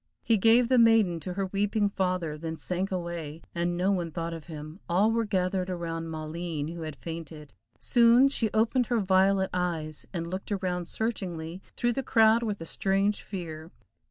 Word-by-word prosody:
He 230 - +3
gave 230 +4 +5
the 255 0 +4
maiden 225 -7 +4
to 180 +3 -5
her 195 +1 -1
weeping 205 +2 0
father, 180 -5 -1
then 160 +1 -5
sank 185 +4 -2
away, 170 -4 -4
and 175 0 -1
no 185 +3 +2
one 175 -4 -1
thought 165 +1 -4
of 165 -2 -8
him, 155 +1 -8
all 195 +6 +3
were 230 0 +1
gathered 185 -2 0
around 165 -2 -4
Maleen, 155 -1 -4
who 170 - -7
had 155 -2 -5
fainted. 160 -2 -8 0.3
Soon 240 +2 +5
she 230 -5 +1
opened 230 +3 +2
her 240 -2 +1
violet 190 0 +3
eyes, 165 -4 -2
and 170 -3 -3
looked 185 +5 -5
around 180 -3 -1
searchingly 180 -7 -3 0.2
through 240 -1 +1
the 270 - -1
crowd 225 -2 +4
with 210 -3 -2
a 165 - -6
strange 195 +4 0
fear. 165 -5 -7
185 Hz, 180 wpm, -28 LUFS, 165-210 Hz, 0.3 s, gave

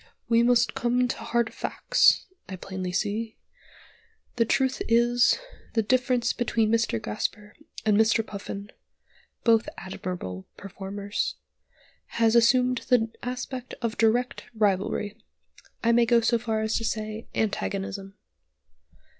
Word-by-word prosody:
"We 230 0 +4
must 240 -1 +3
come 245 +1 +1
to - - -3
hard 235 0 -1
facts, - - +3 0.2
I 190 - -4
plainly 185 0 -5
see. 215 +4 -2 1.0
The 230 - +3
truth 265 +3 +1
is, 240 +1 +4 0.4
the 225 - +2
difference 250 +1 +1
between 225 -2 +1
Mr. 230 - +1
Gasper 210 - -4 0.3
and 215 -1 +4
Mr. 220 +1 +3
Puffin 200 0 -7 0.7
(both 225 -1 +3
admirable 175 - -6
performers) 200 +1 -4 0.8
has 230 0 +4
assumed 250 +1 +4
the 225 -3 +3
aspect 250 0 -5
of 230 -1 -1
direct 240 +2 +1
rivalry; 205 +1 0 0.6
I 235 - +4
may 235 0 +4
go 235 0 +5
so 230 +1 +2
far 220 -2 -1
as 220 0 0
to 230 - -3
say, 215 0 -3
antagonism. 195 -2 -2
225 Hz, 120 wpm, -26 LUFS, 205-235 Hz, 1.0 s, go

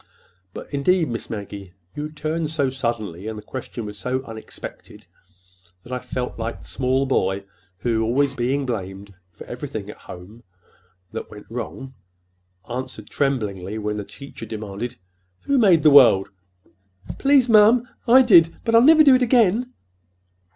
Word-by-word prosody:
"But, - - -10
indeed, 160 +3 +2
Miss 115 -1 -5
Maggie, 100 -3 -7 0.2
you 150 +1 -5
turned 155 +1 -3
so 145 -4 0
suddenly 110 -7 -4
and 110 -1 -5
the 105 - -9
question 120 -1 -7
was 105 -1 -8
so 130 +5 -2
unexpected 110 -2 -10 0.8
that 125 - -9
I 125 - -2
felt 125 -1 -5
like 115 +1 -4
the - - -16
small 130 +1 0
boy 95 -7 0 0.3
who, 115 0 -1
being - - +1
always 135 +5 +1 0.4
blamed 100 -1 -7 0.2
for - - -12
everything - - -6
at - - -15
home 95 +6 -12 0.7
that - - -6
went 105 - -12
wrong, 130 +2 -6 0.7
answered 130 +2 -7
tremblingly, 105 -8 -2
when 105 -1 -3
the 105 - -4
teacher 140 +7 -12
sharply 110 - -4
demanded, 105 +3 -6 0.5
'Who 280 -1 +1
made 180 -9 +5
the 155 - +6
world?' 110 -9 +6 0.9
'Please, 275 -2 +4
ma'am, 225 +2 +5 0.2
I 255 +3 +7
did; 170 -8 +5
but 230 - 0
I'll 230 - +7
never 310 +4 +7
do 275 -3 +7
it 255 - +4
again! 240 0 +3
130 Hz, 155 wpm, -22 LUFS, 105-165 Hz, 0.9 s, I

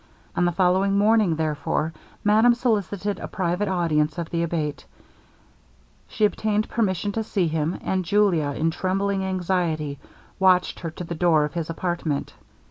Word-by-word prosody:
On 175 - +2
the 175 - +2
following 190 +2 +2
morning, 210 -4 +3
therefore, 155 0 -1 0.3
madame 220 +3 +5
solicited 205 -4 -1
a - - -5
private 185 +2 -1
audience 160 -5 +1
of 170 -2 -4
the 170 - 0
Abate; 160 -3 -3 1.2
she 215 - +1
obtained 215 0 0
permission 205 -3 0
to 220 +2 -2
see 195 -5 0
him, 160 +2 -1
and 190 -1 0
Julia, 185 -5 +2
in 165 +1 +1
trembling 195 +2 -1
anxiety, 175 -6 -1 0.4
watched 185 -1 +3
her 165 - -4
to 165 - -8
the 170 - -5
door 160 -2 +3
of 150 - -6
his 165 -2 -3
apartment. 165 -4 -2
180 Hz, 150 wpm, -24 LUFS, 160-200 Hz, 1.2 s, madame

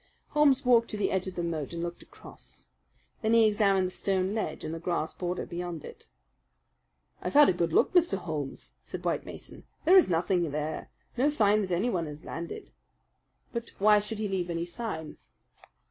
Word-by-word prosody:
Holmes 285 -3 +3
walked 235 -2 +4
to 210 - -4
the 205 - 0
edge 190 0 -1
of 185 - -6
the 175 - -2
moat 160 -3 -3
and 170 0 -3
looked 175 0 -5
across. - - -14 0.6
Then 220 0 +1
he 225 -1 +6
examined 200 -3 +3
the 180 - -3
stone 190 0 -1
ledge 220 - -3
and 155 - -4
the 165 - -5
grass 170 -2 -2
border 180 0 -3
beyond 175 -2 -5
it. 455 +1 -12 1.1
"I've - - -4
had 295 0 +8
a - - +3
good 170 -1 -1
look, - - +3
Mr. 345 - +3
Holmes," 155 -6 -5
said - - -8
White - - -1
Mason. - - -11 0.2
"There 360 +4 +7
is 370 - +7
nothing 175 0 +1
there, 150 +2 -4 0.3
no 270 +4 +3
sign 215 -7 +3
that 190 -2 -4
anyone 180 -2 0
has 150 0 -9
landed 170 0 -7 0.8
but 235 -1 -5
why 210 +1 +5
should 210 +1 -5
he 215 0 -2
leave 185 -3 -2
any 170 0 -2
sign?" 175 -5 -6
185 Hz, 190 wpm, -29 LUFS, 170-220 Hz, 1.1 s, had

